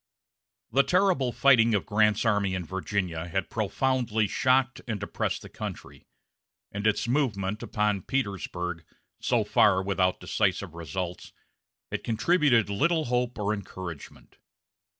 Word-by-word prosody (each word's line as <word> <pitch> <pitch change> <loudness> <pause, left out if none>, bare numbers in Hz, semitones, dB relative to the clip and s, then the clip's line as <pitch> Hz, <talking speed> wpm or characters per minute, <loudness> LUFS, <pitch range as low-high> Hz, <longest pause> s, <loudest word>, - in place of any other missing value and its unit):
The 140 - +5
terrible 180 -6 +2
fighting 115 -4 +4
of 100 - -1
Grant's 105 +1 +2
army 100 -3 +1
in 90 -2 -4
Virginia 95 -3 -3
had 95 +1 -3
profoundly 115 0 0
shocked 130 +4 +1
and 110 -4 -2
depressed 100 - -3
the - - -9
country; - - -8 0.6
and 105 +1 -1
its 110 +2 +1
movement 110 -6 0
upon 105 -2 0
Petersburg, 90 -8 -3 0.4
so - - +1
far 95 -3 +4
without 95 -2 +1
decisive - - -1
results, 85 +2 -5 0.6
had - - -3
contributed 120 0 +3
little 155 +11 +1
hope 125 0 0
or 105 0 0
encouragement. 95 -5 -9
105 Hz, 125 wpm, -27 LUFS, 95-125 Hz, 0.6 s, The